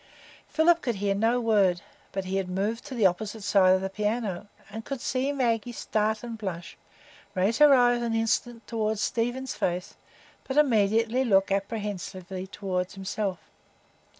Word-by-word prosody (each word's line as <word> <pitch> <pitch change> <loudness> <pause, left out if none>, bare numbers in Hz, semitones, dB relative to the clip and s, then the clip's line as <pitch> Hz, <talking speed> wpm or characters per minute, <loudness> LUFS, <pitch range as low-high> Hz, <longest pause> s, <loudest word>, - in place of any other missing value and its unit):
Philip 335 +1 +3
could 240 -4 -1
hear 200 0 0
no 225 +5 +2
word, 200 -7 +2 0.3
but 195 -1 -3
he 190 +1 -2
had 190 -2 -2
moved 205 +5 -2
to 265 - -7
the 225 -4 +2
opposite 205 +3 0
side 185 -2 +5
of 190 - -1
the 190 - -2
piano, 210 -2 -2 0.2
and 220 +2 -6
could 275 +1 -5
see 260 +3 -1
Maggie 240 -4 0
start 215 -1 -1
and 230 -2 -6
blush, 180 -5 -5 0.6
raise 195 +5 +1
her 295 -1 +8
eyes 245 -1 +4
an 230 -1 -1
instant 225 +1 -1
toward 220 -2 -1
Stephen's 245 +5 -1
face, 180 +1 -2 0.5
but 265 - -4
immediately 230 -2 +3
look 195 -5 +3
apprehensively 195 -2 -4
toward 185 -2 -3
himself. 195 0 -3
215 Hz, 155 wpm, -27 LUFS, 195-235 Hz, 0.6 s, her